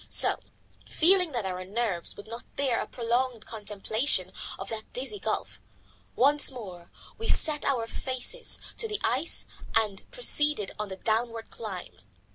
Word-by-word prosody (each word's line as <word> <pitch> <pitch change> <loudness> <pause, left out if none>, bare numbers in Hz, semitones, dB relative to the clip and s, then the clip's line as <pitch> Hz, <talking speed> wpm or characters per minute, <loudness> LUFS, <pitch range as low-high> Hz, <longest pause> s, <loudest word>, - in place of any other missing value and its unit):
So, - - +4 0.5
feeling 360 0 +5
that 235 -5 -1
our 185 -1 -2
nerves 200 -3 0
would 205 - -9
not 230 +2 -8
bear 265 -4 +2
a - - -4
prolonged 240 -1 0
contemplation 210 -1 0 0.3
of 195 - -6
that 220 -1 -5
dizzy 275 +11 -3
gulf, - - -2 0.5
once 285 +3 +4
more 185 -9 -8 0.3
we 455 - -3
set 300 -2 +4
our 250 -5 +2
faces 260 - -1 0.2
to 455 - 0
the 420 -1 -2
ice 255 +9 0 0.3
and 210 -3 +1
proceeded 300 - +3
on 210 -1 -2
the 190 - -4
downward 225 +1 0
climb. 185 - -7
230 Hz, 145 wpm, -29 LUFS, 205-280 Hz, 0.5 s, feeling